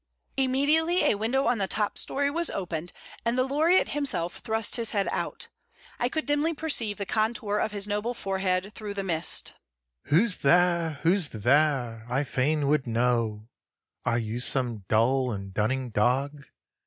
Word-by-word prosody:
Immediately 290 Hz, +7 st, +2 dB
a -, -, +4 dB
window 230 Hz, +6 st, 0 dB
on 235 Hz, -1 st, +1 dB
the 195 Hz, -, 0 dB
top 210 Hz, +1 st, 0 dB
story 280 Hz, +1 st, -1 dB
was 335 Hz, +2 st, 0 dB
opened, 175 Hz, -3 st, -4 dB, 0.3 s
and 235 Hz, +1 st, 0 dB
the 255 Hz, -, +3 dB
laureate 310 Hz, +7 st, +3 dB
himself 270 Hz, -, -1 dB
thrust 220 Hz, -2 st, -1 dB
his 230 Hz, -2 st, -1 dB
head 200 Hz, -2 st, +1 dB
out. -, -, -2 dB, 0.5 s
I 245 Hz, -, +1 dB
could 315 Hz, +4 st, -2 dB
dimly 290 Hz, +3 st, +1 dB
perceive 240 Hz, -10 st, -2 dB
the 200 Hz, -, -3 dB
contour 215 Hz, 0 st, 0 dB
of 220 Hz, -, -1 dB
his 200 Hz, -1 st, -3 dB
noble 210 Hz, +4 st, -2 dB
forehead 190 Hz, -1 st, -1 dB
through 210 Hz, -2 st, -6 dB
the 195 Hz, -, -2 dB
mist. 170 Hz, -3 st, +1 dB, 0.5 s
"Who's 185 Hz, +7 st, +3 dB
there, 170 Hz, 0 st, +2 dB
who's 175 Hz, -2 st, +3 dB
there, 120 Hz, 0 st, +1 dB
I 135 Hz, +3 st, +1 dB
fain 145 Hz, +3 st, 0 dB
would 145 Hz, -3 st, +1 dB
know, 115 Hz, -2 st, 0 dB, 0.5 s
Are 120 Hz, 0 st, +1 dB
you 115 Hz, 0 st, -3 dB
some 120 Hz, -5 st, 0 dB
dull 125 Hz, +4 st, +2 dB
and 95 Hz, -2 st, -6 dB
dunning 125 Hz, +5 st, -1 dB
dog? 135 Hz, +7 st, 0 dB
185 Hz, 160 wpm, -27 LUFS, -, 0.5 s, a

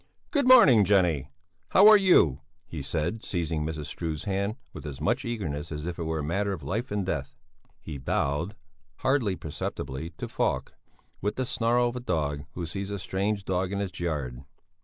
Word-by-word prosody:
"Good 285 Hz, -4 st, +2 dB
morning, 150 Hz, -, +8 dB
Jenny! 85 Hz, -8 st, +2 dB, 0.4 s
How 200 Hz, +2 st, +7 dB
are 215 Hz, -, +10 dB
you?" 175 Hz, -, +5 dB, 0.2 s
he 80 Hz, -, -6 dB
said, 85 Hz, +10 st, -2 dB
seizing 80 Hz, -4 st, -2 dB
Mrs. 80 Hz, -1 st, -4 dB
Struve's 80 Hz, -2 st, -4 dB
hand 100 Hz, +2 st, -1 dB, 0.2 s
with -, -, -8 dB
as 70 Hz, -3 st, -7 dB
much -, -, 0 dB
eagerness 80 Hz, -10 st, -3 dB
as 75 Hz, 0 st, -5 dB
if 90 Hz, -1 st, -4 dB
it 85 Hz, -, -2 dB
were 80 Hz, 0 st, -1 dB
a 75 Hz, -, -2 dB
matter 100 Hz, +6 st, 0 dB
of 80 Hz, -6 st, -7 dB
life 110 Hz, -, -2 dB
and 105 Hz, -2 st, -1 dB
death. 70 Hz, -6 st, -3 dB, 0.4 s
He 75 Hz, -3 st, -7 dB
bowed, 75 Hz, +8 st, -1 dB, 0.5 s
hardly 130 Hz, -8 st, +2 dB
perceptibly, 75 Hz, -1 st, -5 dB
to -, -, -4 dB
Falk, -, -, -1 dB, 0.5 s
with 105 Hz, +2 st, -1 dB
the 130 Hz, -, -1 dB
snarl 120 Hz, +1 st, +2 dB
of 120 Hz, -, -7 dB
a -, -, -2 dB
dog 75 Hz, -9 st, -2 dB
who 85 Hz, -, -4 dB
sees 95 Hz, +4 st, -4 dB
a 100 Hz, -, -3 dB
strange 100 Hz, +2 st, -2 dB
dog 95 Hz, 0 st, -1 dB
in 100 Hz, -, -2 dB
its 95 Hz, -3 st, -4 dB
yard. 70 Hz, -7 st, -3 dB
90 Hz, 185 wpm, -27 LUFS, 75-105 Hz, 0.5 s, are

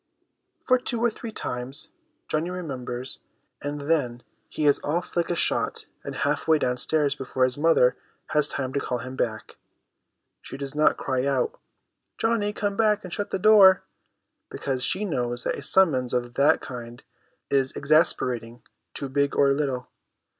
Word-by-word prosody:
For 255 Hz, -1 st, +4 dB
two 245 Hz, -1 st, -2 dB
or 235 Hz, 0 st, +2 dB
three 225 Hz, +1 st, -8 dB
times 135 Hz, -, -5 dB, 0.4 s
Johnny 155 Hz, +3 st, -1 dB
remembers; 130 Hz, -8 st, -4 dB, 0.4 s
and 145 Hz, 0 st, -4 dB
then, 140 Hz, -6 st, 0 dB, 0.3 s
he 155 Hz, -, -2 dB
is 145 Hz, -, +4 dB
off 170 Hz, +4 st, -2 dB
like 170 Hz, -1 st, +1 dB
a 175 Hz, -, 0 dB
shot -, -, 0 dB, 0.2 s
and -, -, -6 dB
half -, -, -1 dB
way 160 Hz, -1 st, +5 dB
downstairs 145 Hz, +2 st, +1 dB
before 130 Hz, -2 st, -2 dB
his 130 Hz, -1 st, +2 dB
mother 145 Hz, -5 st, +3 dB, 0.3 s
has 150 Hz, -1 st, +2 dB
time 130 Hz, -1 st, -3 dB
to 140 Hz, -, +1 dB
call 125 Hz, -2 st, -2 dB
him 130 Hz, +2 st, -7 dB
back. 110 Hz, -4 st, -3 dB, 0.8 s
She -, -, -8 dB
does 140 Hz, 0 st, -5 dB
not 150 Hz, +1 st, +3 dB
cry 130 Hz, 0 st, -1 dB
out, 135 Hz, -3 st, 0 dB, 0.3 s
' -, -, -55 dB
Johnny, 225 Hz, -2 st, +1 dB
come 205 Hz, -1 st, -2 dB
back 210 Hz, -1 st, +2 dB
and 180 Hz, -2 st, -8 dB
shut 205 Hz, -, -3 dB
the -, -, -1 dB
door! 195 Hz, -2 st, +7 dB, 0.3 s
' -, -, -54 dB
because 130 Hz, -2 st, -2 dB
she 200 Hz, +9 st, +1 dB
knows 120 Hz, -8 st, -2 dB
that -, -, 0 dB
a -, -, -7 dB
summons 140 Hz, -6 st, +3 dB
of 120 Hz, -1 st, -2 dB
that 140 Hz, +3 st, +3 dB
kind 120 Hz, -2 st, -8 dB, 0.5 s
is 135 Hz, -1 st, +2 dB
exasperating 125 Hz, -6 st, +1 dB, 0.3 s
to 140 Hz, -, -4 dB
big 140 Hz, +1 st, 0 dB
or 140 Hz, -1 st, +4 dB
little. 135 Hz, -3 st, -2 dB
140 Hz, 170 wpm, -25 LUFS, 125-175 Hz, 0.8 s, door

